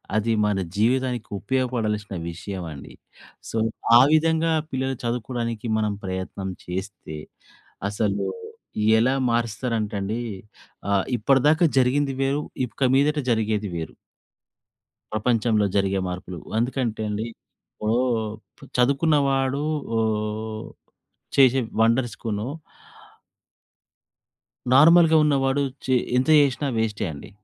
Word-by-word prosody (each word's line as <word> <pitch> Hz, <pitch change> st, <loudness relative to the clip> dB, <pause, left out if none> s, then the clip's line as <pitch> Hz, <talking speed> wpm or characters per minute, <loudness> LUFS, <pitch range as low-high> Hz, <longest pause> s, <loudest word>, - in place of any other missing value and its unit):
అది 110 Hz, +1 st, +1 dB
మన 105 Hz, -2 st, +1 dB, 0.2 s
జీవితానికి 125 Hz, +2 st, 0 dB
ఉపయోగపడాల్సిన 115 Hz, -6 st, -1 dB
విషయమండి. 85 Hz, -4 st, -7 dB, 0.6 s
సో, 115 Hz, -, -3 dB, 0.4 s
ఆ -, -, +8 dB
విధంగా 160 Hz, +1 st, +3 dB, 0.2 s
పిల్లలు 130 Hz, 0 st, -1 dB
చదువుకోడానికి 120 Hz, -1 st, -3 dB
మనం 105 Hz, -1 st, 0 dB
ప్రయత్నం 95 Hz, +1 st, -4 dB, 0.2 s
చేస్తే 95 Hz, -3 st, -6 dB, 0.7 s
అసలు 105 Hz, -1 st, -1 dB, 0.7 s
ఎలా 125 Hz, +3 st, +3 dB, 0.2 s
మారుస్తారంటండి 110 Hz, -2 st, -1 dB, 0.7 s
ఆహ్, 100 Hz, -1 st, +2 dB
ఇప్పటిదాకా 140 Hz, -, +3 dB
జరిగింది 135 Hz, +2 st, +2 dB
వేరు. 140 Hz, +2 st, +1 dB, 0.2 s
ఇక 125 Hz, +2 st, -1 dB
మీదట 150 Hz, +2 st, +3 dB
జరిగేది 110 Hz, -2 st, 0 dB
వేరు. 80 Hz, -2 st, -5 dB, 1.2 s
ప్రపంచంలో 110 Hz, -1 st, +2 dB
జరిగే 95 Hz, -1 st, +1 dB
మార్పులు 90 Hz, -1 st, -6 dB, 0.2 s
అందుకంటే 120 Hz, -2 st, -1 dB
అండి. 105 Hz, +2 st, -2 dB, 0.5 s
ఇప్పుడూ 110 Hz, +2 st, -1 dB, 0.8 s
చదువుకున్నవాడు 140 Hz, 0 st, +2 dB, 0.4 s
ఓహ్! 110 Hz, 0 st, -2 dB, 0.7 s
చేసే 135 Hz, -1 st, +6 dB, 0.2 s
వండర్స్‌కూను... 115 Hz, -2 st, 0 dB, 2.3 s
నార్మల్‌గా 160 Hz, +3 st, +7 dB
ఉన్నవాడు 140 Hz, -1 st, +2 dB, 0.2 s
చె 130 Hz, -1 st, +3 dB, 0.2 s
ఎంత 130 Hz, +5 st, +1 dB
చేసినా 140 Hz, 0 st, 0 dB
వేస్టే 110 Hz, -3 st, -1 dB
అండి. 70 Hz, -1 st, -10 dB
115 Hz, 90 wpm, -24 LUFS, 105-135 Hz, 2.3 s, ఆ